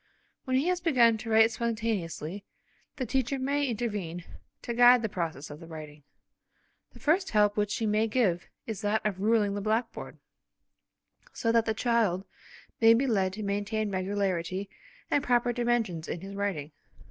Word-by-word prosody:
When 260 -1 +1
he 275 - +1
has 360 -1 0
begun 240 -9 +4
to 225 - -7
write 225 +1 +5
spontaneously 210 -6 -3 0.5
the 260 - -3
teacher 265 +2 0
may 280 +2 0
intervene 205 -8 -3 0.4
to 235 - -3
guide 245 0 +6
the 220 - -1
progress 165 -7 -4
of 145 - -9
the 165 - -11
writing. 155 -2 -9 0.9
The - - -15
first 355 +5 +2
help 210 -1 +3
which 210 -1 0
she 225 - -2
may 215 +1 +2
give 210 -7 +1 0.2
is 220 -2 -5
that 215 +1 0
of 200 -3 -1
ruling 210 -1 +2
the 205 - -3
blackboard, 220 +4 -2 1.2
so 230 - 0
that 230 0 +2
the 220 - 0
child 215 -6 +1 0.5
may 225 0 +7
be 255 +4 +1
led 195 -7 +1
to 215 +2 -5
maintain 205 +1 -1
regularity 190 -1 -2 0.4
and 285 - +2
proper 245 0 +2
dimensions 230 -9 -1
in 170 - -4
his 195 +1 -8
writing. 195 -7 -3
215 Hz, 165 wpm, -28 LUFS, 190-235 Hz, 1.2 s, may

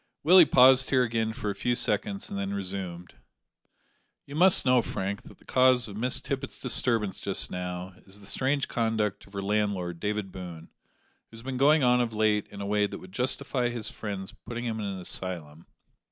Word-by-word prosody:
Willie 175 0 +7
paused 130 +1 +6
here 130 -2 +3
again 115 -2 -1
for 110 -3 -4
a - - -4
few 120 +5 -1
seconds 105 -4 0
and 100 - -4
then 100 0 -3
resumed: 90 -3 -5 1.1
"You 140 - -11
must 180 +2 +5
know, 125 -1 +4
Frank, 100 -2 -4
that - - -15
the - - -23
cause 130 -2 +3
of 100 - -9
Miss 125 +4 +1
Tippet's 140 0 -5
disturbance 115 -5 +1
just - - -1
now 90 +1 -5
is 95 +2 -10
the 100 - -15
strange 135 +6 -1
conduct 110 -4 -2
of 100 - -20
her 100 -1 -4
landlord, 100 -4 -1
David 105 -1 -3
Boone, 90 -3 -9 0.6
who 115 - -13
has 115 - -10
been 130 0 -4
going 145 +2 +4
on 125 0 +4
of 115 -2 -3
late 105 -1 +1
in 100 - -10
a - - -4
way 105 0 +1
that - - -8
would 90 - -13
justify 125 +2 -1
his 115 -3 -4
friends 100 -3 -6
putting 120 +1 -7
him 110 -2 -3
in 105 - -3
an 95 -1 -5
asylum. 85 -4 -6
105 Hz, 195 wpm, -27 LUFS, 95-125 Hz, 1.1 s, Willie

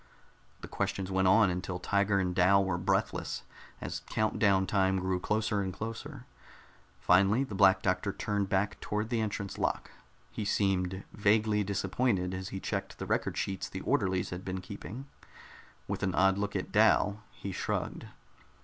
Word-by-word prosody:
The - - -7
questions 95 -1 -2
went 95 0 +2
on 100 0 +5
until 90 0 -3
Tiger 100 +2 +1
and 90 -1 0
Dal 95 +2 +4
were 90 -2 -1
breathless, - - -1 0.4
as - - -4
count 110 0 0
down 100 -3 +4
time 95 0 +2
grew 95 0 -1
closer 105 +1 0
and 95 -1 -2
closer. 115 +7 -7 0.7
Finally 100 +8 +4
the 130 - -7
Black 95 -1 +5
Doctor 95 +1 0
turned 100 -1 -2
back 100 +1 0
toward 105 +1 -2
the 115 -2 +1
entrance 100 -2 -3
lock. - - -1 0.4
He - - -4
seemed 95 -2 0
vaguely 105 0 +2
disappointed 95 0 0
as 95 +1 -5
he 95 - -5
checked - - -4
the - - -5
record - - -1
sheets 95 -1 -2
the - - -6
orderlies 95 -1 0
had 90 +1 -5
been 95 0 -3
keeping. 105 +6 -8 0.8
With - - -3
an 95 -2 0
odd 95 0 +3
look 100 0 -2
at - - -3
Dal, 105 +1 +4
he 100 - -7
shrugged. 90 - -3
100 Hz, 165 wpm, -30 LUFS, 95-105 Hz, 0.8 s, on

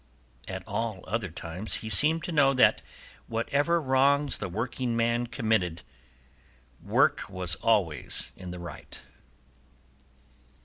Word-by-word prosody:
At - - -7
all 110 -5 -3
other 110 -4 -3
times 85 +5 -3
he - - -4
seemed 155 +11 +6
to - - -4
know 145 -4 +4
that 130 - +4 0.5
whatever 145 +9 0
wrongs 140 0 +2
the 100 - -4
workingman 120 +2 -1
committed 110 - -1 1.0
work - - +1
was 90 -2 -1
always 95 -10 0
in 90 -1 -9
the 90 - -7
right. 85 -4 -10
115 Hz, 115 wpm, -27 LUFS, 90-135 Hz, 1.0 s, seemed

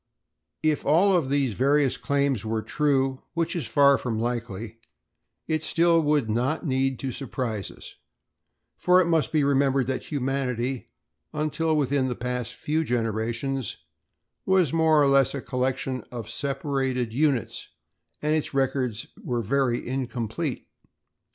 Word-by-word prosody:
If 155 -1 +1
all 180 +7 +4
of 155 -7 +1
these 140 -4 +1
various 135 +3 +2
claims 135 -1 0
were 110 0 -2
true, 135 -3 +1
which 165 0 -1
is 170 - -2
far 140 -2 +5
from 115 -3 -2
likely, 115 -2 -4 0.7
it 155 -1 0
still 170 +1 +3
would 150 -5 +2
not 125 +10 -1
need 135 -2 +1
to 135 - -2
surprise 115 -6 -4
us, - - -12 0.8
for 180 0 +4
it 185 - +4
must 165 -2 +1
be 155 -2 +2
remembered 135 -1 +2
that 130 +1 -3
humanity, 130 -3 -2 0.5
until 155 +1 0
within 140 -2 +1
the 125 - -2
past 125 -1 -4
few 155 +2 -1
generations, 120 +1 -2 0.7
was 185 -6 +2
more 160 -2 +4
or 145 - +5
less 140 0 +4
a - - -2
collection 130 0 -2
of 120 -4 -6
separated 135 -3 -1
units 135 -4 0 0.5
and 150 +1 +2
its 155 -2 -1
records 130 -4 0 0.2
were 120 -2 -1
very 130 +1 0
incomplete. 125 +2 -3
135 Hz, 140 wpm, -26 LUFS, 125-150 Hz, 0.8 s, far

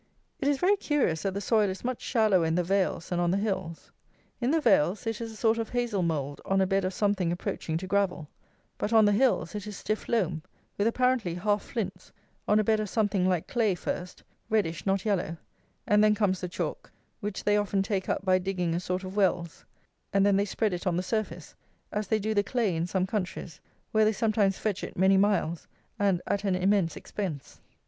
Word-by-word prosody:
It - - -1
is 285 -1 +3
very 385 +7 +3
curious 275 - 0
that 195 +2 -2
the 200 - -2
soil 210 0 +2
is 190 - -6
much 255 -1 -2
shallower 215 -7 +3
in 160 0 +1
the 180 - +2
vales 190 -2 0
than 175 - -1
on 175 -1 +2
the 185 - +2
hills. 190 -5 -3 0.5
In 240 - 0
the 325 +3 +3
vales 195 - +3
it 225 0 -2
is 225 -1 -4
a - - -11
sort 225 +1 +2
of 225 - -3
hazle 240 -5 -1
mould 145 -4 -2
on 195 0 +1
a 190 - +4
bed 195 0 +1
of 185 - -2
something 200 -4 +1
approaching 170 -2 -3
to 180 - -5
gravel; 185 -5 0 0.5
but 210 - -1
on 220 -2 +6
the 205 - +4
hills 245 +3 +2
it 210 0 -5
is 210 - -6
stiff 215 0 -3
loam, 180 -9 0 0.3
with 205 - +1
apparently 245 -7 +1
half 205 +3 +1
flints, 190 -6 -5 0.4
on 210 - +4
a - - +3
bed 220 +1 +2
of 210 -2 -2
something 205 -4 +1
like 180 -3 0
clay 220 -6 +1
first 180 +1 -5 0.3
(reddish, 195 -6 0
not 195 +1 +1
yellow), 180 -6 0 0.5
and 210 0 +4
then 210 0 +5
comes 195 -3 +1
the 180 - -3
chalk, - - -4 0.3
which 205 -2 -4
they 205 - +3
often 205 -1 +1
take 195 -2 -2
up - - -1
by 185 0 +4
digging 180 -2 -1
a 170 - 0
sort 180 +1 -3
of 185 +1 -7
wells; 180 -4 0 0.5
and 195 -1 +3
then 200 -1 +4
they 200 +1 +2
spread 210 0 -1
it 175 +1 -4
on 175 -1 +1
the 180 - -1
surface, 185 -6 -3 0.4
as 210 -1 -2
they 220 - +2
do 215 +1 -1
the 205 - +3
clay 205 -3 0
in 165 +2 -1
some 185 0 0
countries, 180 -5 -4 0.3
where 215 0 +4
they 215 - +4
sometimes 210 -2 +1
fetch 205 -3 -2
it - - -7
many 190 +2 +5
miles 190 -4 +1 0.3
and 195 -3 +2
at 200 - -1
an 195 -3 +1
immense 185 -2 +2
expense. 170 -10 -6
195 Hz, 220 wpm, -28 LUFS, 180-215 Hz, 0.5 s, on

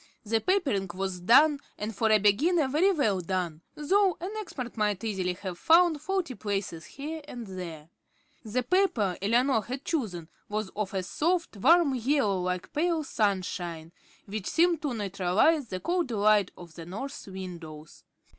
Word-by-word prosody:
The 225 +1 +1
papering 285 - +1
was 190 -1 -3
done, 280 - +5 0.2
and 215 +1 -4
for 220 +2 +1
a 215 - +6
beginner 275 - +3
very 315 +9 +3
well 220 - +1
done, 175 -3 -3
though 375 +5 +2
an 365 +4 -5
expert 260 - -6
might 210 -3 0
easily 190 -5 -1
have 180 -1 -7
found 330 -2 +4
faulty 360 -4 -2
places 195 -7 -4
here 310 +3 -6
and 240 -5 -7
there. 175 -6 -7 0.6
The 240 +3 -1
paper 240 - +2
Eleanor 235 +4 +3
had 255 +6 -6
chosen 200 - -2 0.2
was 210 -1 -3
of 205 -2 -3
a 190 - 0
soft, 335 - -1
warm 315 - +5
yellow 250 -6 +1
like 180 0 -3
pale 325 +1 +1
sunshine, 180 - -2 0.3
which 205 -1 -5
seemed 335 -1 +2
to 280 -5 -2
neutralize 205 - +1
the 185 -3 -4
cold 345 - -1
light 210 -3 +3
of 170 -2 -12
the 165 -1 -9
north 245 +10 -6
windows. 170 -5 -9
215 Hz, 155 wpm, -28 LUFS, 185-300 Hz, 0.6 s, a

